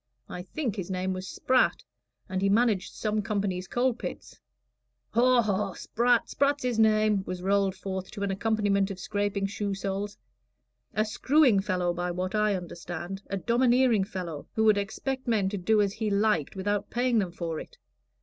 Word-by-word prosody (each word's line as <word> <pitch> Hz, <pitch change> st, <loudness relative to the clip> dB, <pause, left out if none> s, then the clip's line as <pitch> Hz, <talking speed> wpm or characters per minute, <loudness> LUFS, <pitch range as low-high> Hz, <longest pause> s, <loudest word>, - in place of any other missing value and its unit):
I 180 Hz, -, -6 dB
think 235 Hz, +5 st, -3 dB
his 190 Hz, -2 st, -4 dB
name 185 Hz, 0 st, -1 dB
was 185 Hz, 0 st, -5 dB
Spratt, 255 Hz, 0 st, +1 dB, 0.4 s
and 185 Hz, -2 st, -2 dB
he 195 Hz, -, +2 dB
managed 210 Hz, -3 st, +2 dB
some 215 Hz, -1 st, -1 dB
company's 200 Hz, -4 st, -2 dB
coal 250 Hz, +1 st, +1 dB
pits." 235 Hz, -, -8 dB, 0.7 s
"Haw, 245 Hz, 0 st, +4 dB
haw! 205 Hz, -1 st, -1 dB
Spratt 240 Hz, 0 st, +1 dB
Spratt's 285 Hz, 0 st, +1 dB
his 245 Hz, -3 st, 0 dB
name," 215 Hz, -2 st, +3 dB
was 180 Hz, 0 st, -5 dB
rolled 195 Hz, 0 st, +2 dB
forth 190 Hz, -1 st, -5 dB
to 205 Hz, -2 st, -6 dB
an 200 Hz, -, 0 dB
accompaniment 205 Hz, -1 st, +1 dB
of 195 Hz, -, -5 dB
scraping 205 Hz, +1 st, -1 dB
shoe 200 Hz, 0 st, -2 dB
soles. 195 Hz, +1 st, -3 dB, 0.8 s
"A 215 Hz, -, +2 dB
screwing 255 Hz, +1 st, +3 dB
fellow, 180 Hz, -3 st, 0 dB
by 175 Hz, +1 st, -2 dB
what 185 Hz, +2 st, -3 dB
I 210 Hz, -1 st, +2 dB
understand 175 Hz, +1 st, -6 dB
a 195 Hz, -, -2 dB
domineering 240 Hz, 0 st, +3 dB
fellow 175 Hz, -7 st, -6 dB
who 220 Hz, -, +2 dB
would 215 Hz, -2 st, +5 dB
expect 260 Hz, +6 st, -4 dB
men 210 Hz, -5 st, +2 dB
to 205 Hz, -, -3 dB
do 215 Hz, +4 st, +2 dB
as 200 Hz, -1 st, -1 dB
he 220 Hz, 0 st, -2 dB
liked 200 Hz, -7 st, +1 dB
without 200 Hz, +1 st, -1 dB
paying 245 Hz, -1 st, +2 dB
them 185 Hz, -4 st, -1 dB
for 165 Hz, -2 st, -4 dB
it. -, -, -11 dB
205 Hz, 175 wpm, -28 LUFS, 190-220 Hz, 0.8 s, would